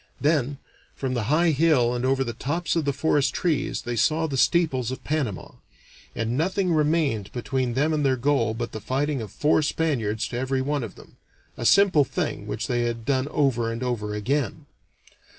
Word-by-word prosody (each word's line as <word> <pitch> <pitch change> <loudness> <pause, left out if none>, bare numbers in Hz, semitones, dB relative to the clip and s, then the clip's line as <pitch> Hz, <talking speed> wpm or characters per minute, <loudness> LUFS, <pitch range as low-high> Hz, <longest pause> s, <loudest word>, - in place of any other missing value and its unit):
Then, 145 -2 +1 0.4
from 130 -2 -3
the 120 -4 -1
high 160 +6 +3
hill 145 -5 +3
and 120 0 -2
over 135 +1 +2
the 120 -2 -4
tops 165 +10 -2
of 165 -3 0
the 140 - +2
forest 140 0 +1
trees, 165 -6 -1
they 120 0 -3
saw 155 +8 +2
the 145 -4 -3
steeples 135 -4 +2
of 130 - -6
Panama, 140 -11 -2 0.6
and 115 +1 -1
nothing 180 +4 +1
remained 150 -9 +1
between 125 0 -2
them 150 +4 +2
and 150 -1 0
their 130 -2 +2
goal 120 -4 +1
but 120 0 -4
the 110 - -6
fighting 140 +2 -1
of 110 - -7
four 150 +1 +2
Spaniards 120 -9 -1
to 120 - -3
every 130 +1 -1
one 145 +1 -1
of 110 - -7
them - - -17 0.4
a 120 - 0
simple 190 -6 +5
thing 130 -5 -3
which 110 +2 -3
they 120 -1 0
had 115 -1 -2
done 135 -1 +1
over 125 -6 +1
and 115 +2 -4
over 105 -4 -2
again. 140 +7 -2
135 Hz, 190 wpm, -25 LUFS, 120-150 Hz, 0.6 s, simple